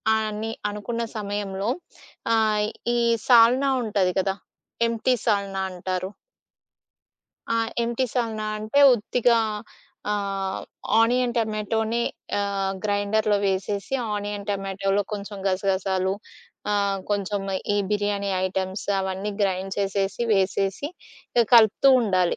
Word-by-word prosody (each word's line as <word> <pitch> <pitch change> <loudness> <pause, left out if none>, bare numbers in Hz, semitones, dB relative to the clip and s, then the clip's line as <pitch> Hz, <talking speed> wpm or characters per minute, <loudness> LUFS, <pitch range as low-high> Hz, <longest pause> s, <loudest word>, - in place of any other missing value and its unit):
అని 220 0 -2 0.2
అనుకున్న 210 +3 -4 0.2
సమయంలో, 200 -1 -3 0.7
ఆహ్, 215 -1 +2 0.3
ఈ - - +2 0.3
సాల్నా 250 +3 +6
ఉంటది 200 -4 +1
కదా! 190 0 0 0.5
ఎంప్టి 230 +2 +1
సాల్నా 200 -3 0
అంటారు? 185 +1 -3 1.4
ఆ! - - +2 0.3
ఎంప్టి 235 +2 0
సాల్నా 225 -3 -1
అంటే 215 +7 +1
ఉత్తిగా, 235 +1 +2 0.7
ఆహ్, 195 -2 -2 0.4
ఆనియన్ 240 +1 +2
టొమాటోనే 220 +1 -1 0.4
ఆహ్, 195 -1 -1
గ్రైండర్‌లో 205 +1 +1
వేసేసి, 200 +4 -2 0.2
ఆనియన్ 205 0 -4
టమాటోలో 195 0 0
కొంచెం 205 0 -5
గసగసాలు 190 0 0 0.6
ఆహ్, 200 -1 +1
కొంచెం 205 0 -1 0.3
ఈ - - +1
బిర్యానీ 205 -1 0 0.2
ఐటమ్స్ 190 +1 -3
అవన్నీ 190 +2 -3
గ్రైండ్ 190 0 -1
చేసేసి, 195 +2 -1
వేసేసి, 195 +5 0 0.5
ఇక 235 - +5
కలుపుతూ 230 +4 +6
ఉండాలి. 185 -5 +1
205 Hz, 100 wpm, -24 LUFS, 195-220 Hz, 1.4 s, సాల్నా